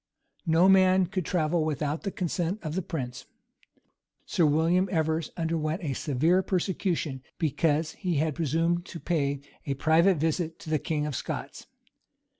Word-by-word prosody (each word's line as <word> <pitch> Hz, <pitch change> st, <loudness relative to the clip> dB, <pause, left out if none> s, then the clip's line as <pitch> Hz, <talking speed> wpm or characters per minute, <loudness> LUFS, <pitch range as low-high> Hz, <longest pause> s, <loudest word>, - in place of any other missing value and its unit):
[] -, -, -42 dB
No 180 Hz, +3 st, +6 dB
man 190 Hz, -1 st, +5 dB
could 180 Hz, -1 st, -3 dB
travel 165 Hz, -1 st, +1 dB
without 150 Hz, 0 st, -2 dB
the 205 Hz, -, -2 dB
consent 175 Hz, 0 st, -2 dB
of 155 Hz, -2 st, -4 dB
the 190 Hz, -, -1 dB
prince. 135 Hz, -8 st, -5 dB, 1.0 s
Sir 165 Hz, -, +2 dB
William 165 Hz, +5 st, +2 dB
Evers 160 Hz, -2 st, 0 dB
underwent 165 Hz, +1 st, -1 dB
a 145 Hz, -4 st, -1 dB
severe 160 Hz, +7 st, +2 dB
persecution 180 Hz, -7 st, -1 dB, 0.2 s
because 155 Hz, +1 st, +1 dB
he 180 Hz, -3 st, -2 dB
had 155 Hz, +1 st, +1 dB
presumed 165 Hz, +4 st, 0 dB
to 170 Hz, -, -8 dB
pay 140 Hz, -3 st, -1 dB, 0.3 s
a 140 Hz, -, 0 dB
private 165 Hz, +6 st, +4 dB
visit 160 Hz, +2 st, -1 dB
to 155 Hz, -, -7 dB
the 155 Hz, -, +2 dB
king 150 Hz, 0 st, -1 dB
of 150 Hz, -3 st, -3 dB
Scots. -, -, -5 dB
160 Hz, 155 wpm, -28 LUFS, 150-175 Hz, 1.0 s, No